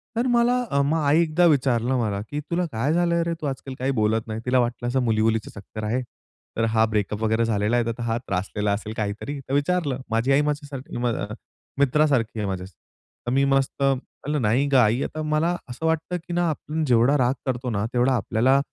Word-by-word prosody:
तर 235 +3 +1
मला 240 0 +3 0.3
मग 155 +3 +1
आई 145 +4 +4
एकदा 170 +2 +3
विचारलं 130 -4 +2
मला, 105 -3 -1
"की 145 - -3
तुला 175 +1 +1
काय 125 +8 0
झालंय 170 0 +2
रे? 170 0 -1
तू 150 - -3
आजकाल 135 0 -5
काही 130 +2 0
बोलत 110 +1 +1
नाही." 110 0 -4
तिला 125 0 +3
वाटलं 120 0 -1
असं 130 +2 +1
मुली, 110 -2 +1
मुलीचं 110 -1 0
चक्कर 110 +2 -8
आहे. 115 +5 0 0.6
तर 115 - +1
हा 110 0 +4
ब्रेकअप 105 0 -2
वगैरे 110 +1 +2
झालेला 105 +1 +1
आहे. 120 - +1
तर 115 +1 -4
हा 115 0 0
त्रासलेला 100 -1 -2
असेल 110 +1 -4
काहीतरी, 110 +7 -3
तर 135 0 -7
विचारलं. 145 -2 0
माझी 115 +4 +1
आई 135 +2 +5
माझ्या 150 - -1 0.4
माझ्यासारखी - - -9
अ, - - -3 0.3
म 110 - -6 0.5
मित्रासारखी 140 -5 +2
आहे 105 - -1
माझ्या. 95 -1 -4 0.6
तर - - 0
मी 135 +2 +3
मस्त 135 0 +1
म्हणलं, 135 +2 -1
"नाही 120 +6 +2
गं 135 - +5
आई." 115 +2 +3
आता 155 - -4
मला 155 +3 +1
असं 125 +7 -5
वाटतं 160 +2 0
की 175 - -4
ना, 175 -1 +1
आपण 155 +1 -3
जेवढा 125 +3 +4
राग 125 -1 +2
करतो 125 -1 -2
ना 105 -1 -1
तेवढा 125 +2 +3
आपल्याला, 125 +4 +2
125 Hz, 210 wpm, -24 LUFS, 110-150 Hz, 0.6 s, आई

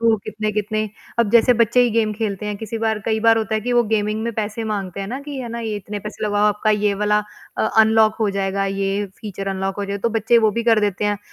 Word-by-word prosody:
तो 230 -1 +4
कितने-कितने 215 0 -2 0.4
अब 230 -3 +2
जैसे 235 +1 +5
बच्चे 235 +2 +4
ही 240 - +2
गेम 220 -1 +1
खेलते 210 -2 -3
हैं, 210 -1 -3
किसी 220 +1 -5
बार 220 -1 0
कई 220 -1 0
बार 225 0 +5
होता 220 0 -2
है 215 - 0
कि 245 +3 -2
वो 240 0 +4
गेमिंग 215 0 0
में 235 0 -2
पैसे 220 +1 -3
माँगते 200 -3 -3
हैं 195 - -4
ना, 260 +5 -4
कि 285 -1 -7
है 245 - -5
ना, 235 0 -5
ये 220 -2 -3
इतने 205 +1 -6
पैसे 215 +1 -6
लगाओ, 205 0 +2
आपका 210 +1 0
ये 210 -1 +2
वाला 210 0 +3 0.4
अ, - - +2 0.2
अनलॉक 220 0 +5
हो 215 - +2
जाएगा, 195 0 -1
ये 195 +1 -1
फ़ीचर 195 -2 -5
अनलॉक 195 0 -2
हो 200 - -1
जाए। 200 0 -4
तो 215 - 0
बच्चे 230 +2 +4
वो 220 -2 +3
भी - - +1
कर 225 -2 +4
देते 205 -1 -1
हैं, 205 -1 0
215 Hz, 260 wpm, -21 LUFS, 205-225 Hz, 0.4 s, जैसे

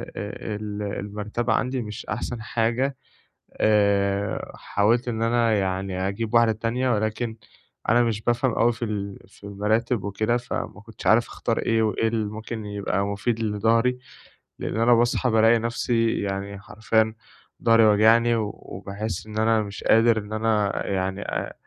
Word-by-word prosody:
آآ 105 +1 -5
ال 105 0 -5 0.2
المَرتبة 105 +3 -2
عندي 125 0 0
مش 105 -1 -7
أحسن 120 +2 -4
حاجة، 120 +4 0 0.6
آآ 100 -1 +1
حاولت 115 +5 +1
إن 115 -1 -2
أنا 115 -1 +2
يعني 95 -1 -1
أجيب 110 +3 -3
1 115 -1 +5
تانية، 115 +4 -1
ولكن 110 +1 -1 0.5
أنا 120 +2 +5
مش 110 -2 -1
بافهم 120 +2 +1
أوي 120 +1 +3
في 115 0 -4
ال 100 -2 -4
في 100 - -22
المراتِب 105 +3 0
وكده. 110 +4 0
فما 120 -3 -5
كنتش 110 0 -8
عارف 115 +2 +5
أختار 115 - -2
إيه، 115 -1 +1
وإيه 110 +1 +1
اللي 110 -1 -1
ممكن 110 0 -6
يبقى 100 -1 -2
مُفيد 100 +3 -1
لضهري؟ 115 +3 +1 0.6
لإن - - -3
أنا 120 +1 +5
باصحى 120 +2 +2
بالاقي 115 +1 +5
نفسي 115 0 0
يعني 100 0 -4
حرفياً 110 +1 0 0.5
ضهري 115 -1 +6
واجعني، 115 +3 +5
وباحس 100 -1 -5
إن 110 0 -7
أنا 110 0 +3
مش 105 -1 -7
قادر، 115 0 +4
إن 105 0 -5
أنا 110 -2 +1 0.2
يعني 95 0 -2
آآ - - -4
110 Hz, 150 wpm, -24 LUFS, 105-115 Hz, 0.6 s, ضهري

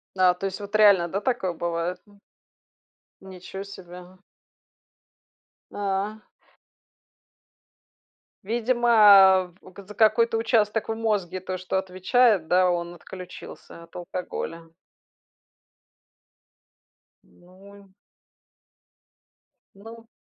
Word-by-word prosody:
Да, 185 -1 +4
то 195 - -6
есть 190 +1 -4
вот 205 +1 -7
реально, 200 -5 +5
да, 195 +4 -4
такое 235 -8 -2
бывает, 170 +2 -3
м? 205 -1 -23 1.0
Ничё 190 0 -9
себе, 185 -3 -12
а! 180 +1 -14 1.5
А. 205 +2 -4 2.2
Видимо, 240 +3 -1
а, 195 -4 +7
в - - -24
у 185 - -13
в 195 +1 -14
за 210 - -10
какой-то 225 +1 +3
участок 225 -1 0
в - - 0
мозге, 205 -5 -2
то, 185 0 -6
что 185 +1 -3
отвечает, 190 +1 +1
да, 180 0 +3
он 175 0 -3
отключился 175 -1 -12
от 170 - -20
алкоголя. 170 -2 -7 2.5
Ну. 195 +2 -19 1.8
Ну. 225 +3 -13
190 Hz, 100 wpm, -24 LUFS, 180-215 Hz, 2.5 s, а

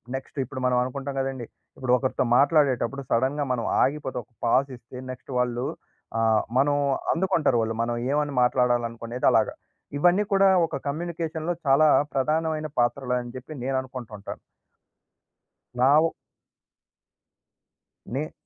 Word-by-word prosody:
Next 135 +1 -7
ఇప్పుడు 130 +1 -7
మనం 125 -1 +2
అనుకుంటాం 135 +2 -5
కదండీ 135 -3 -3 0.3
ఇప్పుడు 130 -1 0
ఒకరితో 130 0 -1
మాట్లాడేటప్పుడు 140 -3 +2
సడెన్‌గా 135 +5 +1
మనం 120 -2 -1 0.2
ఆగిపోతే 135 -2 -2
ఒక 120 - -36
పాజ్ 135 +4 +2
ఇస్తే 120 +2 -13
నెక్స్ట్ 130 +2 -10
వాళ్ళు 125 +1 -1 0.5
ఆహ్, 110 -1 +3 0.2
మనం 145 +1 +3 0.4
అందుకుంటారు 165 -8 +1
వాళ్ళు. 115 0 -2
మనం 120 0 -2 0.2
ఏమని 145 0 0
మాట్లాడాలనుకునేది 120 -1 0
అలాగ - - +3 0.5
ఇవన్నీ 180 +6 +4
కూడా 195 0 +5 0.2
ఒక - - -5
కమ్యూనికేషన్‌లో 165 +1 -3
చాలా 145 +3 +5 0.3
ప్రధానమైన 155 +2 0
పాత్రలని 125 -1 -1
చెప్పి 130 +5 -9
నేను 135 +1 -1
అనుకుంటుంటాను. 120 -6 -8 1.4
నా 130 - +5 0.2
ఓ 165 - 0 2.0
నే 145 +6 -4
130 Hz, 120 wpm, -25 LUFS, 125-150 Hz, 2.0 s, కూడా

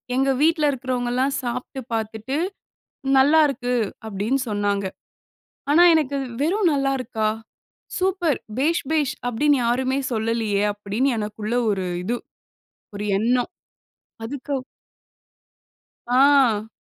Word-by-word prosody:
எங்க 270 +1 +2
வீட்ல 315 -1 +3
இருக்கிறவங்கலாம் 255 +1 -1
சாப்ட்டு 250 +2 -4
பாத்துட்டு, 220 +4 -3 0.8
"நல்லாருக்கு" 275 -3 +3 0.3
அப்டின்னு 220 +7 -1
சொன்னாங்க. 205 -1 0 0.9
ஆனா 340 +4 +7
எனக்கு, 285 -3 0 0.2
வெறும் 360 +3 +2
நல்லா 275 -1 +1
இருக்கா? 220 -3 -1 0.7
"சூப்பர் 365 -5 +1 0.2
பேஷ் 315 +1 +1
பேஷ்" 290 -3 +1
அப்டின்னு 285 +3 +2
யாருமே 260 +3 +1
சொல்லலையே! 220 -2 0
அப்படின்னு 210 +6 -1
எனக்குள்ள 210 +2 -4 0.2
ஒரு 190 -2 -2 0.2
இது. 240 +3 -1 0.8
ஒரு 205 - -4
எண்ணம். 245 +3 +1 0.8
அதுக்கு 280 +4 -5 1.5
ஆ. 250 -4 +4
255 Hz, 95 wpm, -23 LUFS, 220-280 Hz, 1.5 s, ஆனா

